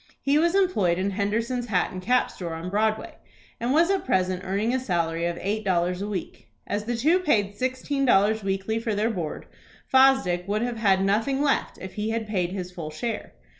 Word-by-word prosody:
He 285 Hz, +2 st, +2 dB
was 340 Hz, +3 st, +2 dB
employed 210 Hz, -, +2 dB
in 190 Hz, +2 st, -1 dB
Henderson's 230 Hz, +5 st, -1 dB
hat 185 Hz, -5 st, +1 dB
and 185 Hz, -, -6 dB
cap 250 Hz, +7 st, +2 dB
store 170 Hz, -3 st, -6 dB
on 170 Hz, +3 st, -6 dB
Broadway, 215 Hz, +1 st, 0 dB, 0.4 s
and 235 Hz, +2 st, -1 dB
was 335 Hz, +6 st, +4 dB
at 390 Hz, -, 0 dB
present 185 Hz, -5 st, 0 dB
earning 200 Hz, +5 st, 0 dB
a 260 Hz, -, +1 dB
salary 170 Hz, -7 st, -1 dB
of 170 Hz, 0 st, -3 dB
eight 210 Hz, +3 st, -2 dB
dollars 180 Hz, -1 st, 0 dB
a 205 Hz, -, -3 dB
week. 200 Hz, -4 st, -6 dB, 0.2 s
As 205 Hz, +1 st, -3 dB
the 240 Hz, +1 st, -1 dB
two 310 Hz, +10 st, +3 dB
paid 205 Hz, -, +1 dB
sixteen 260 Hz, +3 st, -2 dB
dollars 215 Hz, -3 st, +3 dB
weekly 195 Hz, +3 st, -1 dB
for 225 Hz, -2 st, -2 dB
their 215 Hz, +3 st, +1 dB
board, 170 Hz, -7 st, -4 dB, 0.4 s
Fosdick 260 Hz, -10 st, +4 dB
would 210 Hz, +3 st, 0 dB
have 240 Hz, -1 st, -2 dB
had 195 Hz, -3 st, +3 dB
nothing 225 Hz, +7 st, +1 dB
left 280 Hz, -, 0 dB
if 190 Hz, 0 st, -8 dB
he 210 Hz, +1 st, -2 dB
had 225 Hz, 0 st, -2 dB
paid 180 Hz, -4 st, -1 dB
his 180 Hz, -2 st, -5 dB
full 170 Hz, -4 st, -6 dB
share. 225 Hz, +9 st, -4 dB
210 Hz, 205 wpm, -25 LUFS, 185-245 Hz, 0.4 s, was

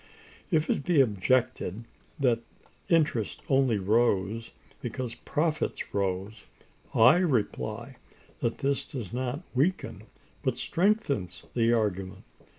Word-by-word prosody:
If 160 Hz, -3 st, +2 dB
it -, -, 0 dB
be 170 Hz, -2 st, +3 dB
objected 120 Hz, -2 st, +1 dB, 0.4 s
that 125 Hz, -4 st, +3 dB, 0.5 s
interest 150 Hz, -, +1 dB
only 135 Hz, -5 st, +3 dB
rose 105 Hz, +1 st, +1 dB, 0.3 s
because 120 Hz, 0 st, -4 dB
profits 155 Hz, 0 st, -2 dB
rose, 100 Hz, +2 st, -2 dB, 0.5 s
I 115 Hz, +9 st, +7 dB
reply 145 Hz, -, -1 dB, 0.4 s
that 115 Hz, -, -1 dB
this 140 Hz, 0 st, 0 dB
does 120 Hz, -7 st, -7 dB
not 130 Hz, +5 st, -2 dB
weaken, 155 Hz, +9 st, 0 dB, 0.4 s
but -, -, -1 dB
strengthens, 175 Hz, -, 0 dB
the 115 Hz, -1 st, +3 dB
argument. 95 Hz, -5 st, -1 dB
125 Hz, 105 wpm, -28 LUFS, 105-145 Hz, 0.5 s, I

